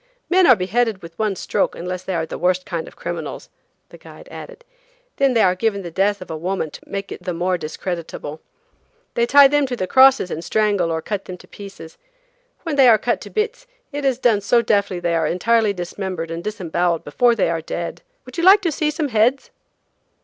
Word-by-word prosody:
"Men 370 0 +5
are 255 - +8
beheaded 215 +1 -1
with 165 0 -12
one 215 -3 0
stroke - - -1
unless 180 +1 -5
they 185 0 -4
are 160 -1 -1
the - - -7
worst 180 +1 +1
kind 170 -2 -4
of - - -13
criminals," - - -6 0.4
the - - -14
guide - - -14
added, - - -10 0.5
"then 275 -2 +2
they 225 - +4
are 180 - +4
given 200 +1 -1
the 170 - -7
death 195 +2 0
of 180 - -11
a - - -3
woman 170 -1 -3
to - - -11
make 195 0 -5
it - - -7
the 180 -1 -4
more 180 +2 0
discreditable. 160 -2 -6 0.7
They 235 0 +1
tie 280 +2 +8
them 290 0 +1
to 250 - -3
the 185 - -2
crosses 260 -3 +5
and 165 - -4
strangle 200 -2 +1
or 160 -1 -2
cut 205 -2 -4
them 185 - -8
to - - -17
pieces. 195 -5 -11 0.6
When 320 -5 -3
they 270 -2 +7
are 225 -2 +7
cut 240 +3 -1
to - - -9
bits, 455 +3 -3 0.2
it 290 0 -4
is 265 -3 +1
done 230 -5 +2
so 235 +4 +3
deftly 200 -4 +1
that 175 - -2
they 170 - +1
are 160 -2 +1
entirely 220 +5 +2
dismembered 180 -2 -5
and 165 +1 -5
disemboweled 175 -4 -1
before 235 +11 +2
they 190 -6 +1
are 165 -1 -2
dead. 170 +1 -5 0.2
Would - - -8
you - - -1
like 385 +3 +7
to 345 -5 0
see 300 +1 0
some 300 -1 -2
heads?" 235 +4 +1
200 Hz, 220 wpm, -20 LUFS, 175-245 Hz, 0.7 s, are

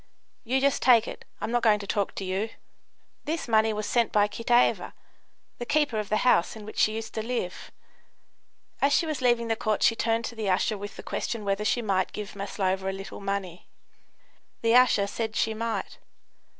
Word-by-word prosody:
"You 260 +3 +1
just 280 0 +2
take 235 -3 +5
it. - - -8 0.2
I'm - - -2
not 240 0 +2
going 215 -2 +4
to 205 - -7
talk 200 0 -1
to 195 - -4
you." 190 +4 -1 0.8
This 320 -1 -3
money 220 -1 +3
was 210 0 -3
sent 235 +1 +1
by 205 -1 +4
Kitaeva, 235 +3 +1 0.7
the 240 - -4
keeper 295 -7 +1
of 210 - -4
the 215 +3 0
house 175 -7 +3
in 215 -2 -9
which 215 - -7
she 215 - +3
used 225 0 -6
to 220 - -2
live. 230 -6 -4 1.1
As 280 +1 +3
she 335 - +3
was 310 -4 -3
leaving 240 -2 +2
the 225 - +1
court 215 -1 -1
she 230 - +4
turned 230 0 0
to - - -5
the 215 -3 -2
usher 190 +4 +1
with 205 0 -7
the - - -9
question 225 -3 -3
whether 200 +1 0
she 235 +3 +1
might 190 -3 0
give 210 -1 -6
Maslova 195 -1 -2
a - - 0
little 195 +1 -8
money. 195 -3 -4 1.0
The 230 0 +3
usher 245 -5 +5
said 220 +2 -4
she 225 - +1
might. 230 +1 -4
220 Hz, 200 wpm, -27 LUFS, 200-235 Hz, 1.1 s, take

